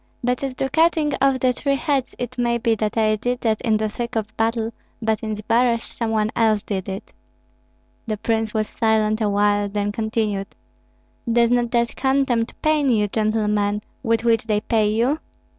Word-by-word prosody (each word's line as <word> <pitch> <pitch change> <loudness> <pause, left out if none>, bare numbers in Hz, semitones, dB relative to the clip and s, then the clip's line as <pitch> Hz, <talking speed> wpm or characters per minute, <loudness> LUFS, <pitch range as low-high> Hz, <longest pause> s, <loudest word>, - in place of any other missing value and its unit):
But 250 0 0
as 265 -2 -3
to 270 - -1
cutting 315 +1 +2
off 270 -1 +3
the 255 -1 +3
three 275 +2 0
heads, 275 -2 -1
it 245 0 -5
may 235 0 +2
be 230 -1 +1
that 215 0 -2
I 215 -1 +3
did 245 +3 -2
that 220 -2 0
in 220 -3 +2
the 215 0 0
thick 235 +3 -5
of 215 -1 -3
battle; 225 0 0 0.3
but 220 -1 0
in 215 -1 -3
Zbaraj 230 +2 +2
some 230 -2 -4
one 215 -1 +1
else 220 -2 +2
did 190 -2 -3
it." 190 0 -7 0.9
The 215 -1 -2
prince 225 0 -1
was 215 -1 -1
silent 220 -1 +1
awhile, 205 -1 +2
then 205 0 -1
continued: 215 -2 -1 0.8
"Does 235 0 +3
not 240 -1 +2
that 235 0 0
contempt 265 -4 0
pain 305 -3 +3
you, 210 -4 +2
gentlemen, 210 -1 0 0.2
with 230 -2 +1
which 230 -1 +2
they 210 -2 +1
pay 220 -2 +1
you?" 245 +8 +1
225 Hz, 180 wpm, -22 LUFS, 215-245 Hz, 0.9 s, off